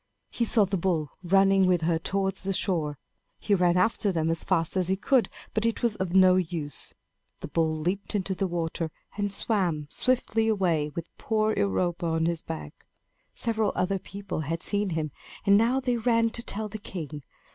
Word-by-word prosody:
He 235 - 0
saw 220 -2 +4
the 195 +1 -1
bull 165 -5 0
running 195 +1 +4
with 180 -2 +3
her 165 0 +1
towards 195 +2 0
the 195 +1 +2
shore. 160 -7 0 0.4
He 205 - 0
ran 180 -2 +3
after 205 +2 +2
them 165 -2 0
as 165 - 0
fast 165 -3 0
as 185 -2 +1
he 190 - +2
could, 235 +2 +2 0.2
but 215 - 0
it 230 +1 0
was 235 -3 +2
of 185 -1 -2
no 185 -1 +7
use. 160 -5 -4 0.5
The - - -5
bull 160 0 +1
leaped 180 +6 -2
into 195 -1 -1
the 190 0 -1 0.3
sea, 165 -2 -1 0.3
and 205 -1 -1
swam 185 -8 0
swiftly 230 -3 +1
away, 175 -8 +1
with 170 - -3
poor 215 0 +1
Europa 170 - 0
on 160 0 +1
his 170 -1 -1
back. 75 -2 -8 0.5
Several 220 -3 0
other 185 +2 0
people 200 0 -6
had 160 +2 -3
seen 205 -1 0
him, 160 -3 -2 0.3
and 200 - +6
now 235 +5 +3
they 250 -2 0
ran 230 -1 +2
to 235 - -4
tell 215 -2 -2
the 215 +1 -7
king. 155 -7 -7
190 Hz, 190 wpm, -27 LUFS, 165-210 Hz, 0.5 s, no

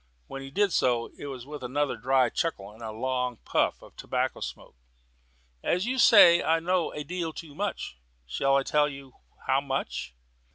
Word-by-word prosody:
When 135 - -7
he 135 - -8
did 200 +5 +1
so, 120 -2 +1
it 145 - -8
was 130 -3 -7
with 145 0 -8
another 140 +3 -1
dry 130 -2 +2
chuckle 105 - -2
and 110 +2 -16
a 110 - -5
long 125 +1 -2
puff - - 0
of - - -16
tobacco - - -2
smoke. - - -8 0.9
"As 180 +3 0
you 260 +2 -1
say, 175 -8 +8
I 165 +1 +2
know 180 +1 0
a 150 - -5
deal 170 +1 -3
too 155 -2 -9
much. 195 - -4 0.3
Shall 135 - +1
I 135 - +1
tell 150 +1 +2
you 135 -2 -11 0.3
how 135 +1 +2
much?" 135 - -4
140 Hz, 180 wpm, -27 LUFS, 125-165 Hz, 0.9 s, say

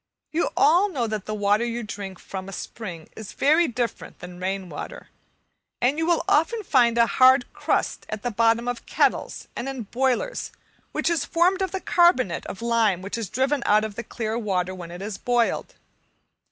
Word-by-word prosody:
You 330 +2 +1
all 360 +6 +5
know 265 -10 -1
that 215 -3 -4
the 215 - -2
water 205 +2 +2
you 235 0 -3
drink 200 -3 -6
from 190 +1 -7
a - - -8
spring 175 -6 -7
is 220 -3 -8
very 315 +4 +4
different 240 -3 -4
from 180 0 -10
rain 190 0 -3
water, - - -8 0.7
and 270 +6 +1
you 325 - 0
will 340 -1 +2
often 405 +4 +2
find 240 - +3
a 235 - +6
hard 255 +1 +5
crust - - -1
at 215 -1 -5
the 245 - -1
bottom 230 +2 +2
of 245 -1 -4
kettles - - 0
and 270 - -3
in 265 -3 -5
boilers, 260 - -1 0.4
which - - -1
is 335 -4 +2
formed 360 +5 +2
of 380 - 0
the 380 - -3
carbonate 305 - +3
of 215 - -7
lime 225 -6 +2
which 195 - -4
is 225 -5 -4
driven 265 +3 0
out 210 +1 +5
of 215 - -6
the 235 - -5
clear 225 0 -3
water 185 -4 -1
when 175 -2 -8
it 175 +2 -8
is 205 -1 -5
boiled. 245 - 0
235 Hz, 195 wpm, -24 LUFS, 205-275 Hz, 0.7 s, a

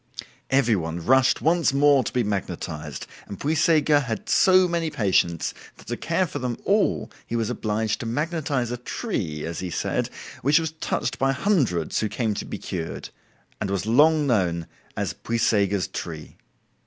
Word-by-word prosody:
Every 130 -4 +3
one 80 -2 -4
rushed 130 0 +4
once 165 -3 +3
more 140 -1 +5
to - - -4
be 125 - +1
magnetized, 85 -7 -4 0.2
and 100 - -8
Puysegur 155 -1 +3
had 115 -6 -4
so 185 -1 +5
many 170 -2 -1
patients 95 - +1 0.2
that - - -16
to 120 - -3
care 170 +8 0
for 165 - -5
them 125 -2 -3
all 205 +1 +1 0.2
he 115 - -3
was 115 0 0
obliged 110 -2 -1
to 115 - -4
magnetize 145 -2 -1
a 125 - -2
tree 95 - -4
(as 85 0 -4
he 90 - -4
said), - - -1 0.3
which 145 +4 +4
was 160 -1 0
touched - - -2
by 135 0 +2
hundreds 130 - +1
who 110 - -1
came 110 -2 -1
to - - -5
be - - -5
cured, 80 -2 -5 0.5
and 100 - -2
was 100 0 -1
long 150 +6 +4
known 90 -10 +1 0.3
as - - -1
"Puysegur's 105 -5 +1
tree". 80 -3 -7
120 Hz, 165 wpm, -24 LUFS, 100-150 Hz, 0.5 s, more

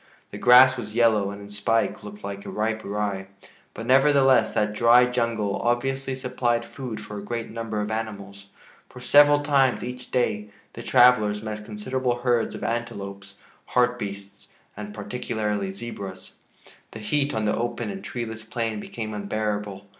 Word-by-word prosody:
The - - -7
grass 130 +1 +7
was 105 -3 -7
yellow 110 -4 +3
and, 100 0 -7
in 100 - -11
spike, 105 +2 0
looked 105 0 -10
like 100 0 -5
ripe 110 +1 -2
rye. 100 -1 -3 0.5
But, 115 - -6
nevertheless, 135 -3 +4
that 105 0 +1
dry 120 +3 +6
jungle 115 -5 -1
obviously 135 +2 -1
supplied 125 -2 -1
food 125 -6 -7
for 105 -1 -7
a - - -9
great 115 +2 -4
number 115 -1 -4
of 105 +1 -3
animals, 100 -3 -6 0.4
for - - -12
several 145 +3 +6
times 140 -3 +2
each 125 0 -7
day 105 -5 0 0.2
the 115 - -8
travelers 115 -4 +4
met 105 -1 -5
considerable 120 +4 -2
herds 120 -3 +1
of - - -7
antelopes, 100 -4 -4 0.4
hartbeests, 105 -5 -1 0.3
and 105 0 -7
particularly 105 -1 -3
zebras. 95 -2 -8 0.6
The 110 - -7
heat 140 +6 0
on 110 -1 -1
the 105 - +1
open 120 - -3
and 195 0 -8
treeless 115 -3 -5
plain 115 -1 -3
became 110 0 -6
unbearable. 105 -1 -3
110 Hz, 155 wpm, -25 LUFS, 105-125 Hz, 0.6 s, grass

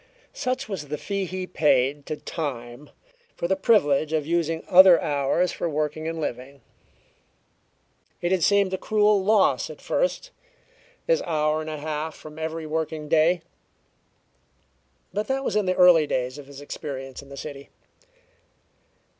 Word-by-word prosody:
Such 255 0 -2
was 185 -8 -5
the 150 +1 -4
fee 195 +6 -3
he 185 +1 -4
paid 145 -4 +1
to 155 - -3
Time 135 -4 -6 0.5
for 170 - -2
the 190 - +2
privilege 155 -8 +2
of 155 -2 0
using 165 0 -1
other 185 -1 +8
hours 145 +5 0
for 170 - -3
working 155 +1 -2
and 165 0 -4
living. 135 -1 -5 1.6
It 175 - -1
had 190 -2 +2
seemed 200 +2 +3
a 190 - -2
cruel 210 -2 +2
loss 210 0 +3
at - - -10
first - - -1 0.7
this - - +2
hour 155 -1 0
and 155 - -6
a 155 - -4
half 155 +1 -4
from 155 0 -12
every 160 0 -4
working 155 -1 -3
day 165 +2 +3 1.7
but 210 +1 -2
that 270 0 -1
was - - -2
in 210 -3 +1
the 185 - +1
early 175 -4 +6
days 130 +2 -2
of 140 - -11
his 140 0 -11
experience 135 -2 -7
in 140 - -16
the 140 - -10
city. 140 -1 -8
160 Hz, 155 wpm, -24 LUFS, 145-185 Hz, 1.7 s, other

